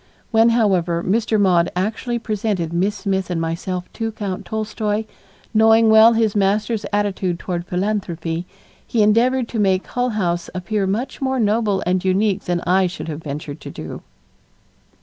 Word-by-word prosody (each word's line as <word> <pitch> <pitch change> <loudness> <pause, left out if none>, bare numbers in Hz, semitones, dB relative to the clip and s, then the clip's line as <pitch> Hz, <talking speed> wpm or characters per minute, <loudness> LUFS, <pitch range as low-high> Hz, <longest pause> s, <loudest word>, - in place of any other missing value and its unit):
When, 225 0 +5
however, 185 -7 +1
Mr. 220 +2 +1
Maude 180 -4 +3
actually 215 +6 -1
presented 210 -7 -2
Miss 190 +4 +1
Smith 190 -3 -2
and 175 -2 -1
myself 170 +2 -3
to 225 0 -3
Count 200 -4 -5
Tolstoy, 215 0 -2 0.5
knowing 220 0 +5
well 220 +1 +8
his 225 -2 +1
master's 210 +2 +1
attitude 200 -4 0
toward 175 0 -4
philanthropy, 180 -3 -2 0.4
he 225 -3 +2
endeavored 240 +4 +3
to 230 - -3
make 190 -2 +2
Hull 250 0 -1
House 175 -3 -1
appear 195 +2 -1
much 225 +10 -3
more 265 -1 0
noble 210 -2 +1
and 180 +1 +1
unique 190 +2 +1
than 175 -1 -1
I 185 +2 +2
should 175 -1 -6
have 155 0 -5
ventured 145 -1 -6
to - - -8
do. - - -8
200 Hz, 155 wpm, -20 LUFS, 180-220 Hz, 0.5 s, well